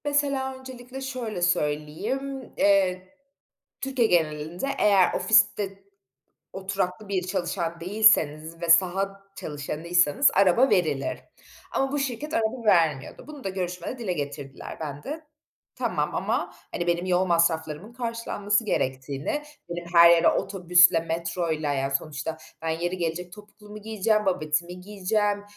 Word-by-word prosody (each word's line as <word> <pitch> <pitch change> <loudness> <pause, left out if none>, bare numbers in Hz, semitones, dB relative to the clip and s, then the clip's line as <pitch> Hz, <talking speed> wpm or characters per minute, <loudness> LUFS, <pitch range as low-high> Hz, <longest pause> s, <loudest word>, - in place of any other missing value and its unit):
Mesela, 280 -2 0
öncelikle 260 0 -9
şöyle 250 -8 -4
söyleyeyim, 175 - -2
eee, 185 -2 +2 0.7
Türkiye 265 -4 +1
genelinde 160 - 0
eğer 195 -3 +4
ofiste 200 -3 +2 0.7
oturaklı 190 +1 -3
bir 185 -2 -2
çalışan 175 -2 -2
değilseniz 165 -5 +2
ve 170 - -3
saha 195 +3 +3
çalışanıysanız 160 - +1
araba 200 +8 +4
verilir 155 -7 0 0.5
ama 270 0 0
bu 290 - -1
şirket 280 +3 -3
araba 230 0 -1
vermiyordu. 165 -9 +2
Bunu 295 -3 -10
da - - -2
görüşmede 180 +5 -4
dile 215 -7 -2
getirdiler. 145 -3 -6
Ben 145 -2 -6
de 310 +3 -6 0.5
tamam - - -2
ama, - - -1 0.2
hani, 175 - -3
benim 175 +1 +1
yol 185 0 +2
masraflarımın 170 +2 0
karşılanması 230 -3 -1
gerektiğini, 135 - -2 0.3
benim 175 0 -5
her 170 0 +9
yere 170 -1 +5
otobüsle, 180 -2 +4
metroyla 165 -2 -2
Yani, 135 0 -1
sonuçta 155 +2 -3 0.2
ben 165 - -2
yeri 175 +3 -2
gelecek, 175 +1 -3
topuklumu 210 +1 -13
giyeceğim, 215 0 0
babetimi 175 0 -1
giyeceğim, 205 +1 -1
185 Hz, 120 wpm, -25 LUFS, 165-215 Hz, 0.7 s, her